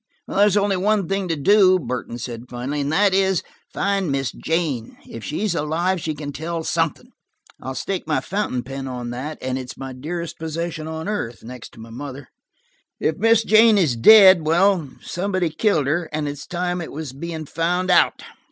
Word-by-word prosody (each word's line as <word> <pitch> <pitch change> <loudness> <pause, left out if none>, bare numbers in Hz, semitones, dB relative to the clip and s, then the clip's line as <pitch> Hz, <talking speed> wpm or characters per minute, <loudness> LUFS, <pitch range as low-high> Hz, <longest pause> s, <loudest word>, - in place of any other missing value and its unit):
"There's 205 0 +3
only 200 -1 +2
one 200 0 +1
thing 195 -1 -1
to 165 - 0
do," 185 +4 +5
Burton 125 -5 -5
said 120 -1 -6
finally, 130 +4 -3
"and 140 +1 -2
that 195 +4 +3
is, 190 -2 +2 0.3
find 195 -5 0
Miss 135 -3 -1
Jane. 155 -9 -2
If 115 - -9
she's 195 +5 -2
alive, 170 +4 -1
she 155 -1 -3
can 145 -1 -6
tell 160 +3 -4
something. 165 -2 -1 0.5
I'll 130 +1 -5
stake 190 0 -3
my 150 -4 +1
fountain 160 -6 -2
pen 135 +1 -6
on 125 -2 -5
that–and 130 0 -4
it's 125 0 -8
my 135 -1 -6
dearest 165 +6 -6
possession 160 0 -4
on 160 +2 -5
earth, 165 - -4
next 125 0 -10
to - - -15
my 115 +1 -11
mother. 135 +2 -8 0.7
If 155 - 0
Miss 225 +1 +4
Jane 220 0 +6
is 160 -11 +2
dead–well, 185 - +6
somebody 185 -2 -1
killed 160 -3 +1
her; 155 +4 -1
and 150 -1 -2
it's 145 0 -6
time 180 0 -2
it 160 - -7
was 150 -3 -6
being 160 +2 -6
found 180 +4 0
out." 180 - +3
160 Hz, 180 wpm, -22 LUFS, 135-185 Hz, 0.7 s, Jane